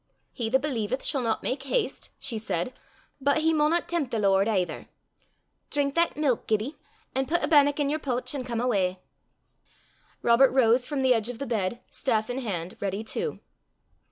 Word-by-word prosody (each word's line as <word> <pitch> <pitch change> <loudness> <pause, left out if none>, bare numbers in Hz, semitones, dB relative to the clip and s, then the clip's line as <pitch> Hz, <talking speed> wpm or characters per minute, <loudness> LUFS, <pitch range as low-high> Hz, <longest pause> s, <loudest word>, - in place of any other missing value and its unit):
"He 230 -3 -2
that 260 - +4
believeth 255 -3 -2
shall 275 -3 0
not 230 -2 -1
make 260 +1 -1
haste," 430 - -2
she 245 -5 -4
said, 195 +2 -2 0.5
"but 280 +2 +3
he 320 +1 +2
maunna 310 +3 +3
tempt 335 -7 -2
the 230 - -2
Lord, 195 -1 +3
aither. 190 -5 -1 0.8
Drink 280 -1 0
that 335 0 +1
milk, 280 -6 0
Gibbie, 220 +7 0 0.4
an' 265 0 0
pit 345 0 +1
a - - +2
bannock 290 -1 +5
i' - - +3
yer 290 +2 0
pooch, 250 -2 -1
an' 275 -3 -3
come 235 -2 -3
awa." 195 -7 +1 1.3
Robert 240 +3 +6
rose 245 -1 +4
from 285 -3 -1
the 260 -1 +5
edge 225 -1 0
of 245 - -5
the 275 - -4
bed, 230 -1 -2
staff 220 -3 0
in 250 - -2
hand, 185 -8 -4
ready 200 +1 -2
too. 455 - -3
250 Hz, 185 wpm, -27 LUFS, 220-285 Hz, 1.3 s, Robert